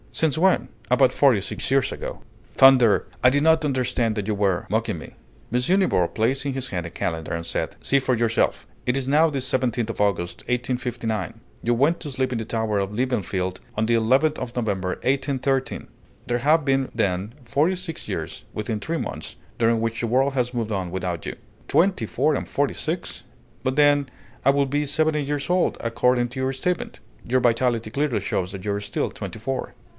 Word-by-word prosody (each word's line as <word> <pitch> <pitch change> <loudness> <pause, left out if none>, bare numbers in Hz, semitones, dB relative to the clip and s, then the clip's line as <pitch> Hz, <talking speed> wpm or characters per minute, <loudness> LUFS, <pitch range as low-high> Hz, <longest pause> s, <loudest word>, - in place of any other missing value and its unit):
Since 155 -3 +1
when?" 185 +3 +3 0.2
"About 125 +1 +4
forty 135 -7 +4
six 95 - -4
years 135 -1 +3
ago." - - -6 0.3
"Thunder! 125 -7 +6 0.2
I 125 - +8
did 145 +3 +1
not 160 0 +4
understand 125 -5 0
that 105 -2 -3
you 110 - +1
were 100 -3 +1
mocking 110 -2 0
me!" 80 - -10 0.4
M. 125 +11 +3
Nibor 90 - +2
placed 120 +8 0
in 140 - -1
his 130 -1 -3
hand 90 -3 -3
a - - -5
calendar, 80 -2 -3
and 85 0 -3
said, - - -3
"See 140 - +2
for 130 -1 +1
yourself! 115 -1 +1 0.2
It 125 +2 +1
is 135 -1 -2
now 155 +4 +4
the 140 -3 -2
17th 125 -3 0
of 110 - -4
August, 90 -4 0
1859; 120 -5 -2 0.2
you 120 +1 +2
went 145 +8 +2
to 150 - -5
sleep 130 0 -1
in 120 - -1
the 110 - -4
tower 110 -2 -1
of 100 0 -2
Liebenfeld 100 -6 -1 0.2
on 110 - +2
the 120 - +1
11th 130 +7 +3
of 120 - -5
November, 100 -6 -1
1813: 135 0 0 0.4
there 120 0 0
have 150 +3 +3
been, 135 -1 +1
then, 100 -1 -1
forty 150 +10 +2
six 180 -3 -5
years, - - -4
within 105 0 -3
three 165 +10 -2
months, - - -5 0.2
during 115 0 +3
which 115 0 -2
the 120 - 0
world 135 +4 +2
has 125 -2 0
moved 115 -3 -2
on 95 -4 -2
without 90 -2 -3
you." - - -4 0.3
"Twenty 175 - +2
four - - +1
and - - -4
forty - - 0
six: - - -4 0.4
but 130 0 0
then 145 -2 +4 0.3
I 135 - +4
would 140 -1 +2
be 145 +1 +1
seventy 155 +1 +1
years 145 +1 -3
old, 180 0 +2
according 120 +1 +1
to 130 +2 -7
your 130 +1 0
statement!" 180 +7 -2 0.2
"Your 130 +2 +1
vitality 120 -2 +1
clearly 140 -2 0
shows 95 -2 -2
that 95 -1 -8
you 100 - 0
are 100 - -2
still 100 0 -2
twenty - - -7
four." 130 +4 -3
125 Hz, 200 wpm, -24 LUFS, 110-135 Hz, 0.4 s, I